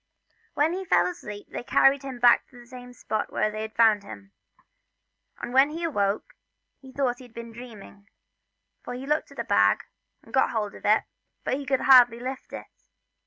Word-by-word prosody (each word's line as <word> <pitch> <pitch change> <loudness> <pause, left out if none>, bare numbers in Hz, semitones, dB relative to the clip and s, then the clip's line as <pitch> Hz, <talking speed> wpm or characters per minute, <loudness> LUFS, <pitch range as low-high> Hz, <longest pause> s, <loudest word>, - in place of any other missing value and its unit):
When 310 +3 +2
he 375 0 -5
was - - +4
asleep 210 -8 -9
they - - -5
carried 270 +3 +3
him 270 -2 -7
back 240 0 +4
to 245 - -18
the 240 - -14
same 250 0 -11
spot 220 -3 -4
where 215 - 0
they 215 0 -5
had 220 0 -7
found 220 -3 +4
him, 100 - -12 1.1
and 245 - -7
when 270 +2 +5
he 330 +3 -6
awoke 215 - -1 0.5
he 265 -1 -14
thought 255 -3 -1
he 255 - -12
had 240 - -20
been 235 0 -8
dreaming, 215 -4 -13 0.7
so 245 - -6
he 255 +2 -7
looked 300 +2 0
for - - -16
his - - -3
bag, - - +3 0.4
and - - -18
got - - +3
hold 210 -3 -3
of - - -12
it, 215 +1 +4 0.4
but - - -2
he 275 0 -4
could 265 -1 +1
hardly 245 -3 +6
lift 260 +2 -7
it. - - -7
245 Hz, 200 wpm, -26 LUFS, 215-270 Hz, 1.1 s, hardly